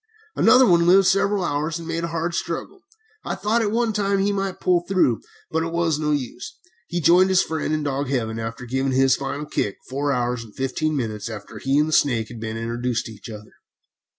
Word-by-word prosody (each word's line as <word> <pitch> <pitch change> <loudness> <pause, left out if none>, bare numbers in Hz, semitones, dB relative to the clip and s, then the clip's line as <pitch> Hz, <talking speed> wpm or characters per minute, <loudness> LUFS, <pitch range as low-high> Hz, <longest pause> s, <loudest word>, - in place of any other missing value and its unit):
Another 255 0 +6
one 170 -5 +4
lived 190 +2 +6
several 200 +1 +2
hours, 155 +1 -1
and 165 -1 -8
made 165 0 -2
a - - -1
hard 165 +1 -2
struggle. 170 - -4 0.4
I - - -3
thought 220 +3 +1
at 215 - +1
one 230 +1 0
time 200 -1 +1
he 195 +1 +1
might 195 -1 -3
pull 180 -1 +2
through, 180 - +2 0.3
but 160 - +1
it 165 0 -3
was 165 -3 0
no 150 -1 -1
use. 140 -5 -3 0.3
He 175 - -2
joined 175 +3 +5
his 190 0 +4
friend 160 -1 -3
in 155 -1 0
dog 140 -1 -2
heaven 115 -4 -2
after 115 +2 -5
giving 130 +2 -1
his 135 0 +4
final 140 +2 -4
kick 105 -9 -2
four 140 +2 -1
hours 125 -2 -1
and 110 -2 -16
fifteen 150 +4 -1
minutes 110 -4 -3
after 105 0 -8
he 135 +4 +1
and 150 +1 +3
the 155 - -3
snake 115 -8 +2
had 120 - -9
been 110 0 -4
introduced 115 +1 -2
to - - -7
each 105 +1 -11
other. 105 -1 -10
150 Hz, 220 wpm, -23 LUFS, 120-175 Hz, 0.4 s, Another